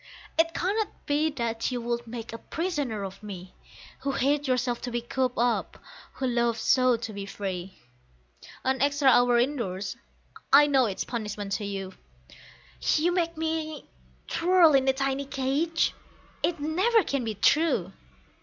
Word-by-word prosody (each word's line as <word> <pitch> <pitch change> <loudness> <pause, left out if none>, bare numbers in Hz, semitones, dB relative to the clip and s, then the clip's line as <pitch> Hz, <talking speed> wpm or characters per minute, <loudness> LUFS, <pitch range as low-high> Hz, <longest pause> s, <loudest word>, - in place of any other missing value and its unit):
It 330 0 +2
cannot 410 +4 -2
be 300 +1 +2
that 235 -4 -2
you 250 - -2
would 235 0 -3
make 230 -1 -7
a 230 - -6
prisoner 290 - -3
of 195 0 -7
me, 190 -3 -9 0.5
Who 275 - -2
hate 285 +2 +1
yourself 250 -1 0
to 245 - -4
be 240 - 0
cooped 250 +1 -2
up, 240 0 0 0.4
who 265 - -3
love 235 -2 +1
so 255 +1 +3
to 225 -1 -6
be 200 -1 -6
free; 190 -2 -5 0.9
An 265 -1 0
extra 285 -1 +3
hour 245 -1 +5
indoors, 230 -7 -1 0.6
I 285 +2 +8
know, 270 -4 +3
is 195 - -3
punishment 210 -4 -4
to - - -3
you; 195 -1 -5 1.0
You 335 +3 +2
make 335 -2 -1
me 315 -2 -3 0.4
twirl 345 -2 +4
a 270 -1 +4
tiny 275 +1 -1
cage? 280 +5 0 0.5
It 345 -2 0
never 380 +10 +2
can 275 -5 -1
be 220 -2 -3
true! 215 - +2
260 Hz, 150 wpm, -27 LUFS, 225-300 Hz, 1.0 s, I